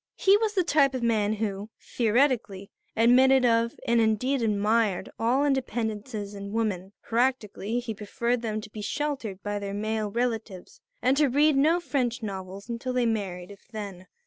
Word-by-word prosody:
He 390 +1 +5
was 435 -1 -1
the 370 - +3
type 280 -5 +3
of 250 - -3
young - - +3
man 215 -2 +1
who, 205 -1 -3
theoretically, 230 -4 0 0.3
admitted 255 +3 +5
of 230 0 +2
and 235 0 +3
indeed 235 +5 +1
admired 210 -2 +1
all 245 +5 +2
independences 220 -6 -2
in 200 0 -7
women; 200 -4 -2
practically 235 -2 -1
he 240 -2 -5
preferred 235 +4 -2
them 215 -2 -3
to 215 - -10
be 215 - -7
sheltered 240 -5 -3
by 205 0 -2
their 200 0 -5
male 215 0 -2
relatives 225 - -3 0.2
and 260 +2 +4
to 300 -1 +4
read 295 +3 +4
no 310 +6 +4
French 250 -8 -2
novels 195 0 -6
until 240 +2 -4
they 250 -1 +1
married 195 -5 -3
if 200 - -15
then. 200 -5 -8
225 Hz, 170 wpm, -27 LUFS, 205-255 Hz, 0.3 s, He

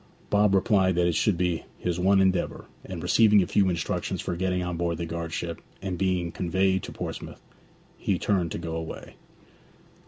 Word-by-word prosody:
Bob 105 -1 +4
replied 95 -2 +3
that 90 0 +3
it 85 - +2
should 100 +2 +2
be 90 -2 0
his 90 -1 -2
one 95 +2 +4
endeavour; 95 -2 0 0.2
and 90 -3 -7
receiving 105 +2 +5
a - - -2
few 100 0 +2
instructions 85 -2 -2
for 85 - -3
getting 90 0 0
on 90 -1 -3
board 85 -1 -1
the 85 - -3
guard 85 0 -4
ship, 85 0 -4 0.2
and 95 -1 -3
being 90 -3 0
conveyed 95 +2 +1
to - - -7
Portsmouth, - - -7 0.6
he 95 - 0
turned 90 -4 0
to - - -3
go 80 -1 -4
away. 80 0 -6
90 Hz, 185 wpm, -26 LUFS, 85-95 Hz, 0.6 s, receiving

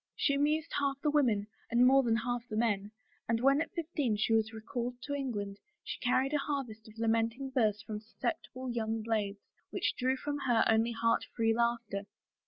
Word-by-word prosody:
She 280 - +2
amused 295 +2 +1
half 275 -1 0
the 300 - +3
women 240 -9 +3 0.2
and 240 +2 +5
more 270 +1 +7
than 235 -3 +2
half 240 +1 -2
the 215 - -4
men 210 -3 +1 0.4
and 230 0 +2
when 275 +4 +4
at 330 - -2
fifteen 300 -9 -1
she 220 +2 +1
was 220 0 +2
recalled 235 +2 -4
to 285 - -3
England 205 -8 -3 0.2
she - - -5
carried 260 +3 +2
a 295 - +3
harvest 265 -7 -4
of 220 +1 -15
lamenting 230 +4 0
verse 215 -6 +1
from 210 -1 -5
susceptible 255 +2 -4
young 225 -1 -1
blades, 210 -3 -1 0.3
which - - 0
drew 260 +1 +1
from 290 +2 -3
her 245 -5 +3
only 225 +1 +3
heart 230 0 +1
free 225 -1 +3
laughter. 235 -4 -1
235 Hz, 190 wpm, -32 LUFS, 220-270 Hz, 0.4 s, more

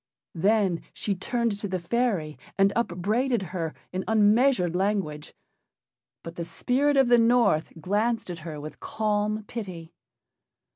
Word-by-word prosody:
Then 190 0 +2
she 205 - -2
turned 225 +2 -1
to 205 - -3
the 185 -1 -2
fairy 175 - -1 0.2
and 195 0 +4
upbraided 220 +1 0
her 165 -4 -3 0.2
in 185 +1 -2
unmeasured 215 -3 +3
language. 185 -6 -1 0.9
But 165 0 -9
the 170 - -2
spirit 275 - +1
of 270 -2 +5
the 240 0 +6
North 230 -9 +3
glanced 210 +3 0
at 170 - -7
her 155 -2 -7
with 155 +1 -9
calm 215 0 -1
pity. 185 -7 -7
205 Hz, 135 wpm, -26 LUFS, 170-230 Hz, 0.9 s, the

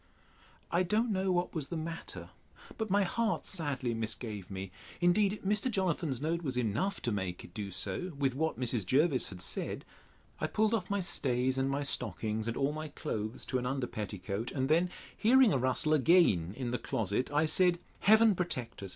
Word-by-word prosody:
I 175 - +3
don't 215 +6 +1
know 190 -1 +1
what 175 0 0
was 150 -5 -3
the 170 - -4
matter, 165 +1 -6 0.5
but 220 -1 -2
my 200 +1 +4
heart 215 -1 0
sadly 140 -8 -1
misgave 110 -3 -3
me: 95 -1 -6 0.3
Indeed, 195 +4 +3
Mr. 210 +5 +1
Jonathan's 170 - 0
note 165 +3 -1
was 135 -6 -3
enough 125 - 0
to 120 - 0
make 95 -4 -3
it 85 - -13
do 100 0 -4
so, 100 - -1
with 135 -2 +1
what 160 +2 -1
Mrs. 120 -4 +1
Jervis 135 - +2
had 95 -3 -8
said. - - -3 0.5
I - - 0
pulled 220 +1 +1
off 195 -6 -1
my 200 -1 0
stays, 130 -6 0
and 135 0 0
my 140 +1 -1
stockings, 110 - -1
and 115 - -2
all 140 +1 +1
my 155 0 -5
clothes 110 -6 -4
to 130 - -1
an 125 - -3
under 135 0 -1
petticoat; 105 0 -4
and 135 0 -1
then 170 +3 +3 0.3
hearing 250 -1 +5
a 135 - +2
rustling 135 +4 +2
again 105 - +4
in 125 -3 -3
the 125 - -1
closet, 110 +3 -1
I 150 +2 +3
said, 175 +2 +3 0.2
Heaven 220 +1 +6
protect 170 - -4
us! 100 - -6
140 Hz, 190 wpm, -32 LUFS, 115-180 Hz, 0.5 s, Heaven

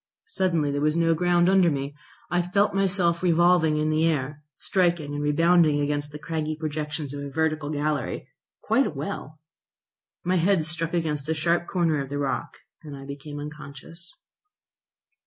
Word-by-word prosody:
Suddenly 170 -6 +1
there 145 0 -1
was 150 +1 +2
no 165 0 +3
ground 175 +1 +3
under 190 -2 +5
me. 140 -1 -3 0.4
I 175 0 +3
felt 200 +4 +1
myself 185 -3 +1
revolving 170 -2 +4
in 155 0 +1
air, 150 -2 0 0.2
striking 175 -6 0
and 145 - -3
rebounding 155 +1 +4
against 145 0 -1
the 150 - -7
craggy 155 +1 -3
projections 150 -2 -4
of 140 0 -5
a 140 - -5
vertical 155 +1 -1
gallery, 150 -1 -2 0.4
quite - - +3
a - - -2
well; 155 +2 -6 0.8
my 185 +1 +1
head 180 -1 +2
struck 165 +1 -1
against 155 -3 -2
a 160 - +1
sharp 170 +2 +1
corner 165 -5 +1
of 135 - -6
the 145 - -3
rock, 140 -2 -2 0.2
and 145 -3 -9
I 135 - -10
became 145 +1 -7
unconscious. 150 +3 -8
155 Hz, 160 wpm, -25 LUFS, 145-170 Hz, 0.8 s, under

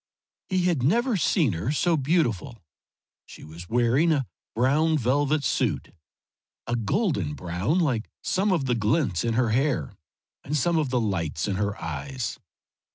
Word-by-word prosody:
He 185 -2 +1
had 175 -7 +1
never 235 - +2
seen 165 - +2
her 85 +11 -2
so 165 +3 +2
beautiful. 130 - 0 0.6
She - - -12
was 85 +3 -11
wearing 120 +8 +3
a 140 -4 +1 0.3
brown 150 +7 +3
velvet 145 +3 +1
suit, - - -1 0.7
a 120 - -1
golden 110 - 0
brown 90 - -1
like 130 -11 0
some 195 +2 +1
of 165 -7 +1
the 125 - +1
glints 110 - +1
in 115 -1 0
her 120 -1 +2
hair 135 -1 0 0.5
and 150 +2 -1
some 165 +4 +2
of 150 -4 0
the 125 -1 +1
lights 90 -9 -1
in 100 -2 -1
her 100 0 -2
eyes. 115 - -4
130 Hz, 155 wpm, -25 LUFS, 105-160 Hz, 0.7 s, wearing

